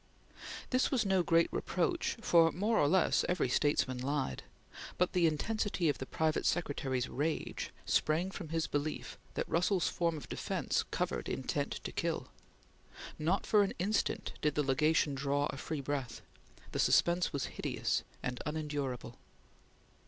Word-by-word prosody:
This 255 0 +3
was 250 -6 +1
no 190 -2 +3
great 165 -1 +4
reproach, 350 - 0
for, 165 -5 +5
more 215 +5 +1
or 145 - +4
less, 180 +3 +3
every 180 -6 +2
statesman 130 -2 +1
lied, 135 - -1 0.6
but 180 - +1
the 175 -2 +4
intensity 185 +2 0
of 145 - -1
the 130 - -5
private 160 -1 0
secretary's 135 -6 0
rage 155 +3 -2 0.2
sprang 165 +5 +1
from 180 -4 -7
his 165 0 0
belief 145 +1 -3 0.2
that - - -1
Russell's 180 +1 +2
form 170 -2 0
of 150 - -9
defence - - -1
covered - - -2
intent - - -2
to - - -4
kill. - - -2 0.9
Not 170 +6 +1
for 210 - +5
an 200 - +1
instant 200 +5 0
did 150 -1 +1
the 150 - +2
Legation 150 +2 +2
draw 140 +1 0
a - - -7
free 155 0 -4
breath. 135 -3 -3 0.5
The - - -3
suspense 175 +1 +3
was 140 -3 -1
hideous - - -1 0.2
and 125 0 -3
unendurable. 145 -6 -3
155 Hz, 150 wpm, -33 LUFS, 145-180 Hz, 0.9 s, for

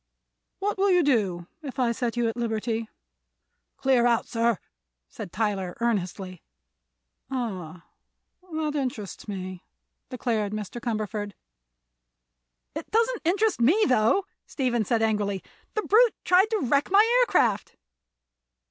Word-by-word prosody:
"What 400 0 -2
will 400 +1 +3
you 360 -2 +5
do 200 - +1 0.2
if 280 -3 -7
I 245 -3 +2
set 235 0 -2
you 240 -1 +2
at 225 - -2
liberty?" 225 -1 -2 0.9
"Clear 255 -3 +3
out, 235 -1 +2
sir," 230 -2 +1 0.5
said 200 -5 -8
Tyler 195 -4 -2
earnestly. 190 -5 -2 0.9
"Ah; 185 -10 -4 0.7
that 310 -1 -2
interests 245 -10 -4
me," 185 -2 -6 0.5
declared 225 -5 -1
Mr. 215 +3 -5
Cumberford. 215 -3 -3 1.4
"It - - -6
doesn't 460 +1 +1
interest 390 - +2
me, 350 - +5
though," 250 - +3 0.2
Stephen 240 -5 0
said 225 0 +1
angrily. 205 -3 0 0.3
"The 430 - 0
brute 460 +3 +5
tried 370 +4 +5
to 440 -3 0
wreck 280 +3 +2
my 405 +3 +6
aircraft." 360 - +2
235 Hz, 120 wpm, -26 LUFS, 210-305 Hz, 1.4 s, my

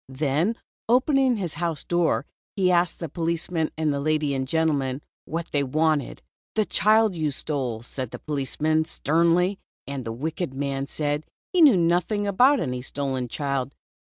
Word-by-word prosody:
Then 150 - 0 0.3
opening 260 0 +3
his 175 -6 -3
house 165 -4 -1
door, 175 -4 +1 0.3
he 185 -2 +3
asked 175 -1 +2
the 165 - -2
policeman 165 +1 -1
and 155 -2 +1
the 140 - -1
lady 155 -1 +1
and 130 -1 -2
gentleman 145 -3 0 0.2
what 165 +1 -4
they 145 - +1
wanted. 150 +1 0 0.3
"The 215 -1 +2
child 215 +2 +3
you 155 -3 -1
stole," 130 -5 -2
said 130 0 -5
the - - -7
policeman, 155 +2 0
sternly, 170 +5 +2 0.3
and 140 -2 -5
the 115 - -4
wicked 150 +4 -4
man 140 0 -2
said 150 +1 -2 0.3
he 360 - +4
knew 280 - +8
nothing 175 +5 +1
about 250 +8 +4
"any 125 - -2
stolen 130 -1 -3
child." 140 0 -2
155 Hz, 160 wpm, -25 LUFS, 140-175 Hz, 0.3 s, knew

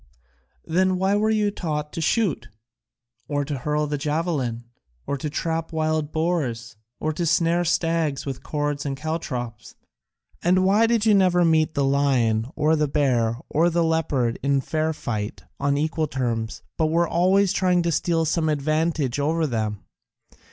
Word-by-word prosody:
"Then 185 +3 +2
why 190 +2 +2
were 215 +1 +2
you 210 -2 +2
taught 150 -6 -4
to 165 - -3
shoot? 175 - 0 0.8
Or 145 -1 -1
to 140 -2 -4
hurl 150 +3 0
the 145 -1 -3
javelin? 145 -6 -1 0.4
Or 140 - -2
to 145 +2 -4
trap 165 +2 -2
wild 155 -1 -1
boars? 145 -9 -2 0.2
Or 155 0 -1
to 175 - -3
snare 170 +1 +2
stags 165 -4 0
with 135 -2 -5
cords 145 -1 -2
and 135 -1 -3
caltrops? 130 -8 -5 0.7
And 185 +2 +3
why 210 +4 +4
did 230 -2 +1
you 215 - +5
never 180 -3 +4
meet 160 -1 +2
the 140 - +2
lion 130 -5 +2
or 155 +1 +2
the 150 -1 +1
bear 125 -6 +1
or 165 +3 +2
the 170 0 +1
leopard 145 -7 0
in 140 +1 +2
fair 155 +4 -1
fight 105 - -4 0.2
on 140 0 +1
equal 155 +1 0
terms, 115 -4 -3 0.2
but 160 - +3
were 170 +2 +2
always 185 +3 +3
trying 180 -2 +2
to 170 - 0
steal 165 0 +1
some 160 0 0
advantage 155 -2 0
over 160 +3 +1
them? 110 -6 -2
155 Hz, 160 wpm, -24 LUFS, 140-170 Hz, 0.8 s, you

